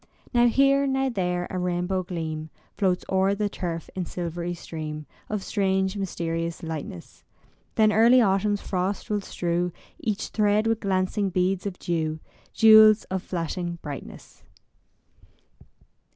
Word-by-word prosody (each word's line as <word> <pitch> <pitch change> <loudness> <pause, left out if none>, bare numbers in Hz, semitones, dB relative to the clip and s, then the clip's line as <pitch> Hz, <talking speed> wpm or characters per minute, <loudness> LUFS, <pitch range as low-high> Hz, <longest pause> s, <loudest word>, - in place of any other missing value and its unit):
Now 240 0 +5
here, 275 +3 +4
now 270 0 +1
there, 180 -5 -1
a 185 - -2
rainbow 180 +1 -1
gleam 160 -3 -5 0.3
Floats 185 -3 0
o'er 190 +1 +2
the 205 0 -1
turf 170 -4 -4
in 185 -2 -3
silvery 175 0 -4
stream 155 -2 -6 0.2
Of 210 -2 -2
strange 190 -1 0
mysterious 170 -3 -3
lightness. 155 - -7 0.5
Then 215 -1 +4
early 235 +4 +6
autumn's 205 -1 +2
frosts 190 +3 -2
will 205 -1 0
strew 175 -1 -2 0.3
Each 215 -2 -2
thread 210 0 +2
with 225 -1 +1
glancing 195 +1 0
beads 185 +1 0
of 185 -2 -5
dew, 160 -2 -2 0.3
Jewels 220 -1 +7
of 190 -1 -1
flashing 175 0 -3
brightness. 145 -4 -9
185 Hz, 130 wpm, -25 LUFS, 170-210 Hz, 0.5 s, Jewels